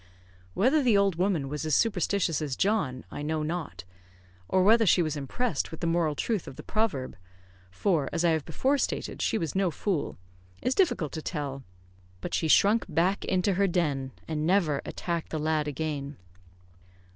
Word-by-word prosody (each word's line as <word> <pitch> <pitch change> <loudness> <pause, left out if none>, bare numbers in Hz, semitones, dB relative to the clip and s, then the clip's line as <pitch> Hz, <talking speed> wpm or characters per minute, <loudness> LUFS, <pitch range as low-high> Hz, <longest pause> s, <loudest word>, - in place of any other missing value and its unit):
Whether 265 +9 +3
the 240 -6 +4
old 200 -4 +2
woman 180 -6 +1
was 150 +2 -4
as 155 -3 +1
superstitious 195 -6 +1
as 145 -4 -2
John, 190 -12 0
I - - -6
know 155 +1 -1
not; 155 - -4 0.7
or 185 - +3
whether 225 +2 +5
she 175 - +5
was 155 -2 -2
impressed 150 - -2
with 160 - -9
the - - -3
moral 165 -2 +1
truth 215 +3 -2
of - - -8
the - - -9
proverb 215 -13 -1 0.5
for, 145 - 0
as 170 - 0
I 170 - +5
have 160 -2 0
before 265 - 0
stated, - - -2
she - - +1
was 165 -7 -2
no 190 -1 +2
fool 170 0 -2 0.4
is 255 - 0
difficult 195 - +1
to 160 - -5
tell; 145 -4 -4 0.6
but 175 - -6
she 160 - +1
shrunk 205 +8 +4
back 175 +5 +1
into 190 +1 +1
her 200 +2 +2
den, 150 -7 0 0.2
and 155 -1 -2
never 170 -7 +2
attacked 170 -2 -3
the 160 - -3
lad 155 0 0
again. 145 -1 -4
165 Hz, 180 wpm, -28 LUFS, 150-200 Hz, 0.7 s, whether